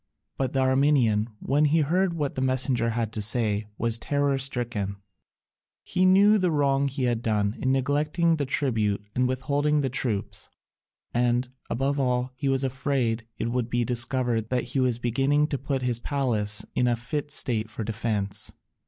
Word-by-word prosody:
But 130 -2 -2
the 135 - +1
Armenian, 130 -5 +3
when 145 +7 +1
he 155 +2 +3
heard 175 +4 +1
what 145 -4 -2
the 130 - -3
messenger 130 -2 +1
had 115 -1 -2
to 110 - -3
say, 105 -1 +2
was 115 0 0
terror 140 0 0
stricken: 120 -7 -1 0.9
he 185 0 +1
knew 200 +3 +6
the 185 -2 +2
wrong 140 -2 +2
he 135 0 -3
had 120 -2 0
done 105 -2 0
in 130 - +1
neglecting 150 +5 +1
the 145 -3 -2
tribute 110 -7 0
and 125 0 +1
withholding 145 +3 0
the 135 -3 -1
troops, 115 -6 -2 0.6
and, 120 +1 +1 0.2
above 140 +3 0
all, 125 -1 0
he 135 +2 -2
was 135 0 +1
afraid 130 -4 -1
it 115 - -2
would 120 -1 -1
be 120 0 0
discovered 120 -2 -1
that 125 -1 0
he 135 - +1
was 125 -3 +2
beginning 135 +5 +1
to 140 - -2
put 135 -1 -2
his 120 -2 0
palace 115 -7 0
in 125 - +1
a 120 - +2
fit 140 +5 -4
state 115 -6 0
for 110 0 -5
defence. 105 -2 -2
130 Hz, 170 wpm, -26 LUFS, 115-140 Hz, 0.9 s, knew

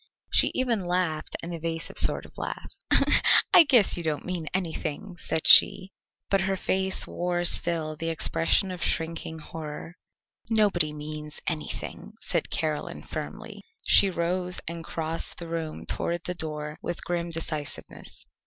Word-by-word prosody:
She - - +5
even 245 -4 0
laughed 175 -4 -2
an 170 +1 -6
evasive 165 0 -2
sort - - +7
of - - -14
laugh. - - -7 0.8
"I - - +9
guess 245 - +4
you - - -3
don't 155 -3 -3
mean 180 -3 -5
anything," 175 0 -4
said 160 - -2
she, 190 +1 +7 0.4
but 195 -1 +1
her 190 0 -1
face 190 0 +1
wore 175 0 -3
still 165 -3 +1
the 165 +2 -4
expression 165 +3 +1
of 180 -1 -4
shrinking 160 0 -2
horror. 160 +2 -9 0.5
"Nobody 200 -8 +2
means 150 0 -7
anything," 160 -3 -5
said - - -2
Caroline 155 -2 -4
firmly. - - -8 0.2
She 195 - +7
rose 180 +1 -2
and 165 0 -5
crossed 165 0 -2
the 170 - -7
room 165 -2 -5
toward 170 0 -2
the 180 - -3
door 150 -2 -5
with 175 - -5
grim 175 -1 -3
decisiveness. 160 -3 -6
170 Hz, 145 wpm, -26 LUFS, 155-180 Hz, 0.8 s, I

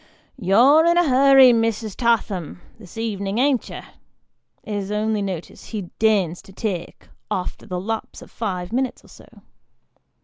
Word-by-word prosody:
" - - -40
You're 270 +10 +6
in 340 0 +3
a 350 -2 +3
hurry, 270 -1 +7
Mrs. 225 -2 -1
Tatham, 215 -9 -1 0.2
this 200 -1 -14
ev'nin', 205 -2 -3
an't 265 -1 +1
you? - - -7 0.5
" - - -49
is 195 -1 -4
the 210 - -2
only 215 0 0
notice 185 -4 -6
he 200 -6 -6
deigns 200 -6 +1
to - - -16
take, 190 -3 -5 0.2
after 180 - -4
the 180 -1 -3
lapse 220 +4 -5
of - - -17
five 185 -3 -4
minutes 260 +1 -2
or - - -19
so. - - -16
220 Hz, 165 wpm, -22 LUFS, 195-240 Hz, 0.5 s, hurry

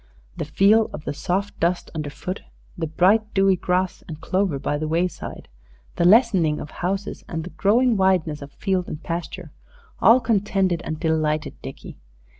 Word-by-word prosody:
The - - -4
feel 205 +8 +4
of 150 - -8
the - - -2
soft 190 +7 -2
dust 175 +2 0
underfoot, 155 +4 -5 0.3
the 165 -2 -3
bright, 200 +7 +2
dewy 195 -1 +4
grass 180 +1 -1
and 155 -2 -7
clover 185 -3 0
by 145 +2 -2
the 155 - -2
wayside, 170 +3 -3 0.5
the 170 - +2
lessening 190 -7 +4
of 150 - -7
houses 195 +3 -3
and 165 -2 -4
the 180 - -8
growing 220 +9 +3
wideness 180 -6 +1
of 140 0 -9
field 185 0 -1
and 155 - -7
pasture, 170 0 -5 0.5
all 235 +3 +6
contented 195 -6 +1
and 155 -1 -4
delighted 155 -2 0
Dickie. - - -9
180 Hz, 160 wpm, -23 LUFS, 160-195 Hz, 0.5 s, all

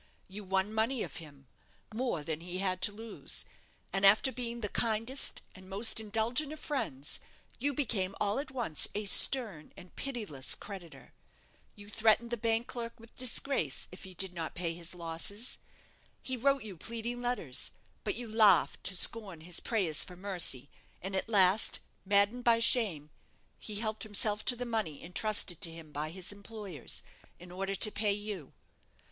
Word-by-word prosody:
You 205 +2 -9
won 190 +2 -1
money 225 +3 +1
of - - -7
him 145 -5 -12 0.5
more 225 - -2
than 160 +1 -4
he 180 +1 -5
had 185 -1 -1
to 205 - +6
lose; 220 +2 -3 0.5
and 195 0 -1
after 210 +7 +6
being 235 -1 -5
the 210 - -1
kindest 230 +5 +1
and 185 0 -14
most 215 +4 +3
indulgent 225 +7 +1
of 310 - -8
friends, 170 - -2 0.4
you 285 +4 +1
became 200 -9 0
all 210 +4 +1
at 285 - -5
once 235 - +2
a 210 0 -2
stern 200 - +4
and 180 - -14
pitiless 210 - -1
creditor. 190 -5 -10 0.6
You 205 0 -13
threatened 220 +2 +2
the 240 - -1
bank 225 +1 0
clerk 235 -1 -5
with 230 0 -16
disgrace 255 - +1
if 180 - -11
he 190 -1 -10
did 190 +1 +2
not 165 -2 -5
pay 170 -1 -1
his 170 +1 -5
losses. 175 +7 -2 0.6
He 260 - -3
wrote 275 +2 +1
you 200 -5 -9
pleading 235 +5 -5
letters; 240 - -1 0.3
but - - -2
you 240 +1 -6
laughed 215 -5 +4
to 185 - -1
scorn 195 -3 +3
his 170 +1 -1
prayers 190 -10 +1
for 180 - -11
mercy, 175 -8 +1 0.3
and 190 +1 -5
at 190 - -2
last, 195 -1 +4 0.3
maddened 205 +5 +3
by 235 -1 +5
shame, 205 - +3 0.5
he 210 - -6
helped 215 0 -2
himself 210 0 0
to 250 - +4
the 245 +1 -4
money 215 -11 -2
entrusted 180 0 +2
to 170 - +4
him 165 -2 -10
by 150 +1 -2
his 185 +3 -2
employers, 200 - -5 0.3
in 175 0 -13
order 195 +2 -3
to 215 - +5
pay 205 -1 +1
you. 205 -7 -6
205 Hz, 170 wpm, -32 LUFS, 180-230 Hz, 0.6 s, to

